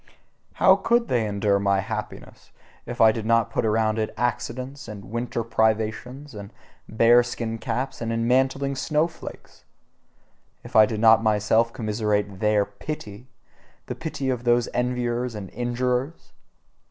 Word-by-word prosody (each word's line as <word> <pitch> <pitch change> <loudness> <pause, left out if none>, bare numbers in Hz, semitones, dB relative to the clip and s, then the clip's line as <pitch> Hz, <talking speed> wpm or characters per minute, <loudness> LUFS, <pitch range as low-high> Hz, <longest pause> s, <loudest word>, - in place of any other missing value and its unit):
How 190 +1 +5
COULD 235 +4 +1
they 115 -4 +1
endure 100 -1 +1
my 100 -1 +2
happiness, - - -7 0.4
if - - -6
I 110 -1 +7
did 110 0 -4
not 115 0 +2
put 115 - 0
around 110 0 +1
it 110 - -1
accidents, 125 +3 -3
and 100 -2 -9
winter 115 0 -2
privations, 110 +5 -1
and 100 0 -9 0.4
bear 115 +2 +5
skin 115 -2 -4
caps, 135 +3 -3
and 115 0 -2
enmantling 130 +4 +1
snowflakes! 155 +4 -3 1.0
If - - -12
I 110 -1 +7
did 110 - -4
not 115 0 +6
myself 110 +1 +2
commiserate 105 -4 -2
their 105 -1 +2
PITY, 105 +1 -8 0.6
the - - -4
pity 140 -4 -3
of 125 -2 -3
those 120 -1 +2
enviers 125 -1 -1
and 100 -3 -7
injurers! 125 +4 -2
115 Hz, 140 wpm, -24 LUFS, 110-125 Hz, 1.0 s, I